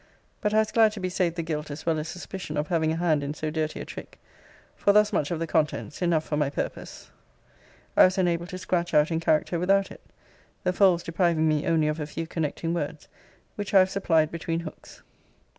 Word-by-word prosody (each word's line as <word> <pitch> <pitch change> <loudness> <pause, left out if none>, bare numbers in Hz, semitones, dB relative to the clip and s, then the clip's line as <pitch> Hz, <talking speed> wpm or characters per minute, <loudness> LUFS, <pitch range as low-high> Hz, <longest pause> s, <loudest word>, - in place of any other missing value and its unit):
But 210 - +1
I 215 - +2
was 220 0 +2
glad 220 -2 +4
to 215 - -7
be 185 -1 -2
saved 180 -2 0
the 170 - -2
guilt 155 -2 -4
as 145 +2 -7
well 160 -2 +1
as 155 - -4
suspicion 180 -3 -6
of 150 0 -2
having 160 -2 +1
a - - -1
hand 165 -3 +1
in 145 +1 -4
so 155 0 -3
dirty 155 -1 -2
a - - -6
trick; - - -10 0.6
for 200 - +3
thus 210 +1 +4
much 145 -6 0
of 170 - -2
the 165 - -2
contents 155 0 -1
(enough 170 -3 +2
for 150 - -3
my 150 -2 +1
purpose) 140 - -6 0.8
I - - +8
was 185 +1 +1
enabled 175 -1 0
to 185 - -5
scratch 175 -2 -1
out 150 +2 +4
in 165 - 0
character 165 +1 +1
without 195 +2 +2
it; - - -12 0.6
the 180 - +1
folds 180 -3 +4
depriving 165 -2 +1
me 155 +2 +1
only 160 -2 +2
of 155 +1 -1
a 150 - -3
few 165 +2 -5
connecting 165 0 -3
words, 155 -2 -4 0.4
which 205 0 -4
I - - +10
have 185 0 +5
supplied 160 -5 +2
between 165 0 -3
hooks. 160 - -11
165 Hz, 225 wpm, -26 LUFS, 155-185 Hz, 0.8 s, I